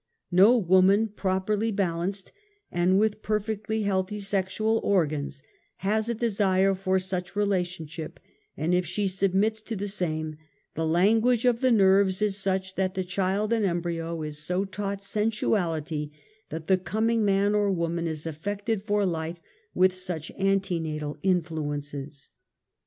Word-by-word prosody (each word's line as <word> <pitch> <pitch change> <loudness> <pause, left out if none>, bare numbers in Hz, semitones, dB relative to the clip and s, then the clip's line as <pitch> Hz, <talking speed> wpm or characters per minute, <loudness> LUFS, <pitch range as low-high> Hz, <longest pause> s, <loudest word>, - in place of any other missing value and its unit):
_^ - - 0
Xo 220 +1 +6
woman 190 +5 +5
properl} 190 0 -1
^ 220 -1 -1
balanced 185 +1 -2 0.4
and 180 +2 +3
witli 215 0 +1
perfectly 215 +1 -2
healthy 200 +1 -1
sexual 200 +3 0
organs 150 -6 0 0.4
lias 215 +3 +1
a 235 - 0
desire 195 -4 +2
for 190 0 0
such 185 -1 -3
relationship, 180 -6 -2 0.4
and 160 +4 0
if 180 0 +3
she 180 +4 -1
submits 195 +3 +1
to 225 +1 -5
the 205 +1 -3
same, 155 -6 -2 0.4
the 160 0 -1
Language 220 +8 +3
of 240 -2 +3
the 260 - +4
Xerves 195 -3 +4
is 210 -2 +1
such 190 -1 -1
that 190 0 -1
the 190 - -1
child 195 +4 0
in 225 -2 +1
embryo 170 -2 -2
is 150 -1 -5
so 180 +5 0
taught 200 0 -4
sensuality 175 -8 -1 0.4
that 160 -1 -6
the 190 +2 +3
coming 220 +4 0
man 200 0 +2
or 205 -1 +2
woman 170 -1 -1
is 160 -1 -4
affected 200 +7 -3
for 205 -1 +1
life 165 -1 -2 0.4
with 185 0 +4
such 180 -4 -4
antenatal 165 -6 -1
inlluences. 145 -5 -2
190 Hz, 145 wpm, -27 LUFS, 170-205 Hz, 0.4 s, Xo